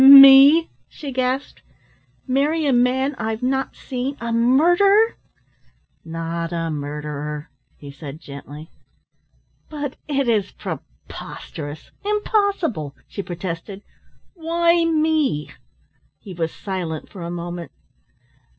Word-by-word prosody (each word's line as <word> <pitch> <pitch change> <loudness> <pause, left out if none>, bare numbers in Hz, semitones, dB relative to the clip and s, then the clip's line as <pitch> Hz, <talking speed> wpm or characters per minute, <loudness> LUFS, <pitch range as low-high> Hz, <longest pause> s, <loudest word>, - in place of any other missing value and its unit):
"Me?" 275 +4 +10 0.2
she 285 -4 -7
gasped. 255 +2 -2 0.6
"Marry 290 +4 +1
a 275 - +3
man 255 +3 +2
I've 220 +1 -3
not 265 +1 -1
seen 265 +2 -4
a 235 0 -3
murderer?" 350 - +4 0.9
"Not 165 +1 -4
a 165 -1 -2
murderer," 150 0 -5 0.3
he 145 -1 -10
said 140 +1 -9
gently. 145 +1 -10 1.0
"But 290 -3 -5
it 275 -3 0
is 210 -4 +1
preposterous, 150 -1 -8
impossible!" 400 - 0
she 200 - -5
protested. 185 +2 -6 0.5
"Why 335 0 +2
me?" 310 - +1 0.7
He 195 - -10
was 165 -2 -2
silent 180 -6 -5
for 190 - -10
a 170 - -5
moment. 175 0 -6
235 Hz, 105 wpm, -21 LUFS, -, 1.0 s, Me